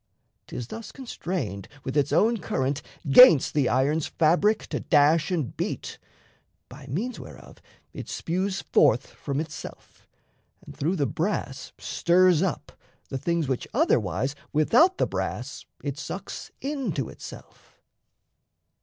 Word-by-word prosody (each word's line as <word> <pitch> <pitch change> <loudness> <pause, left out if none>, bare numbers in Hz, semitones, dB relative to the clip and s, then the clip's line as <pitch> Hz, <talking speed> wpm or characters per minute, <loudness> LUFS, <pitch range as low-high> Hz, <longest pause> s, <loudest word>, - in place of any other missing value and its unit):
'Tis 120 - -6
thus 230 0 -8
constrained 170 - -5 0.2
With 130 - -4
its 145 -1 +2
own 230 +2 +3
current 140 -5 -2 0.3
'gainst 165 - +8
the 145 -4 +2
iron's 145 +4 +1
fabric 175 +7 +2
To - - -2
dash 155 +2 +3
and 160 -9 -2
beat; - - -4 0.7
by 135 +2 -12
means 210 - -3
whereof - - -12 0.3
it - - -7
spues 185 +3 -2
Forth 120 +5 +3
from 140 -1 -5
itself 160 0 -8 0.6
and 145 - -11
through 155 +6 0
the 145 -6 +1
brass 155 -5 -3
stirs 180 -1 +3
up 185 -5 -2 0.4
The 135 - -3
things 170 0 0
which 130 -2 -2
otherwise 125 - +1 0.2
without 245 - +4
the - - +2
brass - - -4 0.2
It - - -4
sucks - - -6
into 255 - -2
itself. - - -12
155 Hz, 125 wpm, -26 LUFS, 135-190 Hz, 0.7 s, gainst